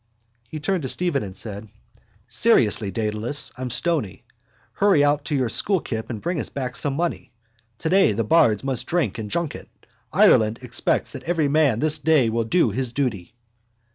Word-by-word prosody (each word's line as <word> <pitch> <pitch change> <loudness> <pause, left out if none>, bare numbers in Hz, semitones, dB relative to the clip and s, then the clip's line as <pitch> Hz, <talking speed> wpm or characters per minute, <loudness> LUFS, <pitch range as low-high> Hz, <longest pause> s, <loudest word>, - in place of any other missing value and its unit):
_ - - -45 0.5
He 155 - -6
turned 180 +4 -1
to 130 - -3
Stephen 175 -4 0
and 95 -2 -8
said: 105 0 -6 0.6
—Seriously, 115 - +2
Dedalus. 110 +7 -2
I'm 125 0 -5
stony. 125 - 0 0.5
Hurry 195 -8 +3
out 145 0 +1
to 150 - -2
your 130 -3 +1
school 190 - +2
kip 110 -7 -5
and 115 -4 -5
bring 170 - -3
us - - -2
back 130 -2 -5
some 140 0 -1
money. 170 +3 -3 0.5
Today 180 - +3
the 110 +3 -1
bards 110 -4 +3
must 135 -3 -2
drink 150 - -1
and 105 -1 -5
junket. 170 +4 -3 0.4
Ireland 110 +1 +4
expects 125 - -1
that - - -9
every 160 -4 0
man 140 -6 +2
this 155 0 +1
day 150 -5 +3
will 115 0 -1
do 170 +10 +2
his 130 -2 -3
duty. 120 -9 -3
130 Hz, 175 wpm, -22 LUFS, 110-160 Hz, 0.6 s, Ireland